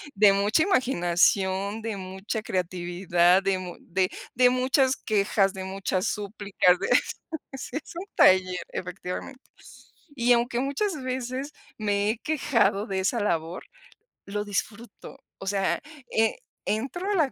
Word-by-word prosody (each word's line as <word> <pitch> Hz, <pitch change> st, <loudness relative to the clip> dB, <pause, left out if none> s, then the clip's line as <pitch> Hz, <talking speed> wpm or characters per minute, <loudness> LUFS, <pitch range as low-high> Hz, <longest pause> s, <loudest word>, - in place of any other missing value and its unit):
de 200 Hz, 0 st, +6 dB
mucha 205 Hz, +9 st, +3 dB
imaginación, 195 Hz, -, +2 dB
de 225 Hz, -3 st, -3 dB
mucha 190 Hz, +4 st, -4 dB
creatividad, 180 Hz, -1 st, +1 dB
de 195 Hz, -1 st, +1 dB
mu 180 Hz, -1 st, -7 dB
de 185 Hz, +1 st, 0 dB, 0.2 s
de 250 Hz, 0 st, +5 dB
muchas 260 Hz, +1 st, +2 dB
quejas, 200 Hz, -2 st, +1 dB
de 190 Hz, -, -6 dB
muchas 190 Hz, -1 st, -2 dB
súplicas 200 Hz, -3 st, +1 dB
de 195 Hz, -, -2 dB, 0.7 s
sí 265 Hz, +1 st, -5 dB
es -, -, -8 dB
un 350 Hz, +3 st, -5 dB
taller, 185 Hz, -1 st, +4 dB
efectivamente. 180 Hz, +8 st, -6 dB, 0.7 s
Y 245 Hz, -1 st, +4 dB
aunque 240 Hz, 0 st, +1 dB
muchas 290 Hz, +7 st, -1 dB
veces 260 Hz, +2 st, -3 dB, 0.2 s
me 205 Hz, -1 st, 0 dB
he 225 Hz, -, -4 dB
quejado 250 Hz, -9 st, +1 dB
de 195 Hz, -1 st, -2 dB
esa 220 Hz, +5 st, 0 dB
labor, 170 Hz, -3 st, -1 dB, 0.6 s
lo 205 Hz, +1 st, -3 dB
disfruto, 205 Hz, +2 st, -5 dB, 0.2 s
o 195 Hz, -, -8 dB
sea, 195 Hz, -1 st, +1 dB, 0.3 s
eh, 225 Hz, 0 st, +2 dB, 0.3 s
entro 270 Hz, -, -2 dB
a 410 Hz, -, +1 dB
la 305 Hz, -7 st, +2 dB
205 Hz, 135 wpm, -26 LUFS, 190-250 Hz, 0.7 s, de